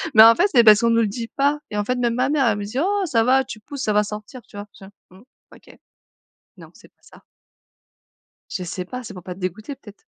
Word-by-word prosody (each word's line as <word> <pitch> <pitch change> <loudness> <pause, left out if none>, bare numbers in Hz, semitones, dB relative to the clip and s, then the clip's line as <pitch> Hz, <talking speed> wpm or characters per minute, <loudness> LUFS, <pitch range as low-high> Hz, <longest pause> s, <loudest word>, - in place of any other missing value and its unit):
Mais 220 - +10
en 230 0 +8
fait 380 +4 +3
c'est 240 -2 +6
parce 215 +1 +7
qu'on 235 - +2
nous 230 0 +3
le 215 - +1
dit 230 +3 -6
pas. 285 +1 0
Et 210 - -4
en 205 - -1
fait, 250 - -1
même 240 -1 -1
ma 255 +2 0
mère, 290 -3 +1
elle 210 -2 +1
me 205 - -5
dit: 230 +5 -7
«Oh 400 +2 0
ça 230 -8 +1
va 265 +2 +3
tu 215 - -9
pousses, 280 +4 -7
ça 210 - 0
va 210 0 +3
sortir», 210 +4 -9
tu 205 - -14
vois? 205 +1 -8
J'étais 195 - -14
là: 195 - -15 0.3
«Mmh, - - -19 0.3
OK.» - - -19 0.8
Non, - - -14
c'est - - -19
pas - - -50
ça. - - -19 1.3
Je 180 - -4
sais 180 +1 -5
pas, 250 +6 -7
c'est 205 - -9
pour 180 - -10
pas 180 -1 -7
te - - -17
dégoûter 215 - -5
peut-être? 210 -6 -16
230 Hz, 270 wpm, -21 LUFS, 205-260 Hz, 1.3 s, Mais